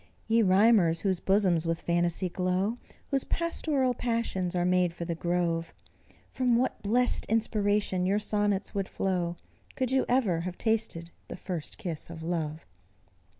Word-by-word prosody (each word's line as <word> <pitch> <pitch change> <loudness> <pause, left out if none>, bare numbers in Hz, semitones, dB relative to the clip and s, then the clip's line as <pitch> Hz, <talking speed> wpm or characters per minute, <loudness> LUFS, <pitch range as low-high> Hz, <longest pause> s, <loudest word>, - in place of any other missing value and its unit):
Ye 225 +1 +4
rhymers, 190 -4 +4
whose 190 -3 0
bosoms 185 -5 +2
with 165 0 0
phantasy 175 +1 0
glow, 185 +5 -1 0.3
Whose 275 -1 +1
pastoral 300 -6 0
passions 230 -8 -2
are 175 0 +1
made 180 -1 +2
for 170 - -5
the 170 - -2
grove, 170 -1 -1 0.6
From 250 -2 +2
what 255 +2 -1
blest 245 +4 +1
inspiration 205 -4 +1
your 200 +2 +2
sonnets 205 -2 0
would 195 -2 -2
flow, 175 -3 -1 0.4
Could 260 -2 -1
you 265 0 +2
ever 230 -10 +2
have 180 +1 -5
tasted 215 -7 -1 0.2
the - - -7
first 175 -5 -5
kiss 170 -9 -5
of 165 -1 -8
love! 160 -2 -3
190 Hz, 150 wpm, -28 LUFS, 170-225 Hz, 0.6 s, Ye